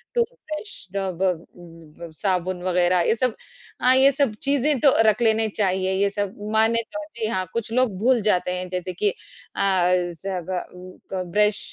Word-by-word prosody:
Tooth 475 -1 +3 0.3
brush 305 - -6
अ, 200 - +1
ब 180 -1 -1
ब 165 -1 -13
ब - - -14
साबुन 185 0 -1
वगैरह, 180 0 +2
ये - - +3
सब 245 0 0 0.5
हाँ, 255 +1 +5
ये 270 +1 +6
सब 275 -4 +1
चीज़ें 280 0 +1
तो 275 +2 +5 0.2
रख 215 - 0
लेने 220 -1 +3
चाहिए। 190 -2 0
ये 200 +1 +2
सब 205 -1 -3 0.2
माने 225 +1 +3
तो 305 0 -4
जी 225 -2 -2
हाँ, 190 -4 -1
कुछ 230 -1 -3
लोग 250 -6 +1
भूल 245 +1 +3
जाते 185 -3 +1
हैं, 180 0 -4
जैसे 185 0 -4
कि 200 +2 0 0.4
आ 195 -1 +2
अ 180 0 +3 0.2
ज़ग 180 0 -5 0.3
उम, 180 +1 -10 0.2
क 185 -1 -1
ब्रश 210 +1 +2
200 Hz, 190 wpm, -23 LUFS, 180-230 Hz, 0.5 s, ये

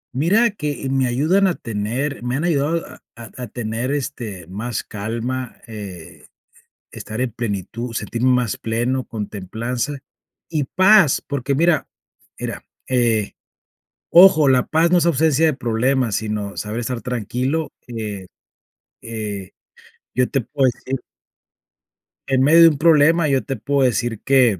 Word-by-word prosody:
Mira 205 - +3
que 150 -7 -4
me 135 -1 +2
ayudan 160 +11 +2
a 180 - 0
tener 120 +6 -3
me 125 +1 -2
han 145 - -1
ayudado 165 0 0
a - - -13 0.2
a 115 -1 -10
a 125 -2 -6
tener, 120 +2 -3
este, 120 - -4
más 105 +6 -4
calma, 115 +4 -4
eh, 95 -7 -10 0.7
estar 110 +2 -6
en 125 -2 -1
plenitud, 115 +1 -4
sentirme 115 +2 -1
más 125 -4 +1
pleno, 120 +4 -1
con 105 -3 -5
templanza 115 +7 -4 0.5
y 155 -3 -1
paz, 190 0 +5
porque 140 -1 -2
mira 170 0 +2 0.5
mira, - - -5 0.2
eh, 115 -5 +1 0.8
ojo, 165 -5 +7
la 125 -1 +3
paz 165 +2 +2
no 180 - +5
es 170 - +2
ausencia 160 -1 +3
de 155 - +3
problemas, 125 -1 0
sino 105 -2 -3
saber 110 +3 -3
estar 120 0 -3
tranquilo, 125 +6 -2 0.2
eh 105 -5 -6 0.7
eh, 105 -4 -6 0.6
yo 125 0 +1
te 135 - 0
puedo 135 +3 0
decir 135 0 -5 1.3
en 130 -1 +2
medio 165 +4 +6
de 165 - +10
un 150 - -2
problema, 160 +1 +4
yo 135 -2 +1
te 135 -2 -4
puedo 135 +5 +1
decir 120 -2 -2
que, 125 -8 +3
125 Hz, 145 wpm, -20 LUFS, 115-145 Hz, 1.3 s, de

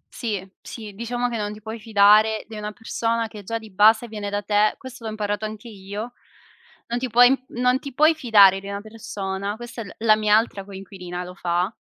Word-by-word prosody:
Sì, 205 -6 -3
sì, 215 -3 -9
diciamo 240 +3 -2
che 235 -1 -3
non 210 -1 -3
ti 210 - -11
puoi 220 +2 -7
fidare 215 0 +4
di 225 - -10
una 210 0 -5
persona 230 +1 -2
che 215 -1 -10
già 230 +4 -3
di 220 -2 -12
base 220 +4 +5
viene 210 -2 -5
da 205 0 -2
te, 210 +1 +2
questo 260 -2 -11
l'ho 220 - -3
imparato 210 0 -3
anche 215 +2 -7
io, 205 +3 -7 0.7
non 240 +1 -2
ti 255 0 -3
puoi 245 +3 +6
non 250 +1 +1
ti 280 -2 -8
puoi 310 +3 +5
fidare 205 -10 +5
di 195 - -10
una 200 - -4
persona, 200 -2 -5
questa 240 +1 -8
è 220 - -7
l 195 - -10
la 215 -1 +7
mia 215 0 +4
altra 220 -3 -1
coinquilina 190 -2 -7
lo 180 0 -9
fa 180 +2 -1
215 Hz, 210 wpm, -23 LUFS, 200-230 Hz, 0.7 s, la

